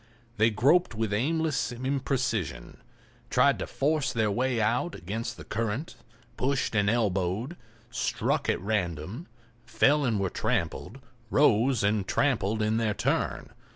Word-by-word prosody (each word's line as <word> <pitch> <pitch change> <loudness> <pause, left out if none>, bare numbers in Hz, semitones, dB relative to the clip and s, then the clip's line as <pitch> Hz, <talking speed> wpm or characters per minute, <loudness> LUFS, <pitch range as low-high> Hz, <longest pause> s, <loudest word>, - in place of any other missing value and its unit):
They 110 +2 +4
groped 130 - +3
with 110 -1 -1
aimless 155 +5 0
imprecision, 125 - -2 0.5
tried - - +3
to - - -3
force 150 0 0
their 110 -2 +1
way 125 +3 0
out 120 +10 0
against 110 +5 -5
the - - -9
current, 115 +7 -3 0.4
pushed 135 -1 0
and 105 -2 +2
elbowed, 105 - 0 0.4
struck - - -1
at - - +1
random, 95 - -3 0.4
fell 140 +6 +3
and 115 -6 +1
were 95 -2 -1
trampled, 125 +9 -2 0.3
rose 125 -3 +3
and 100 -1 +1
trampled 110 -6 +1
in 110 +1 +1
their 110 -2 0
turn. - - -1
115 Hz, 130 wpm, -28 LUFS, 105-135 Hz, 0.5 s, They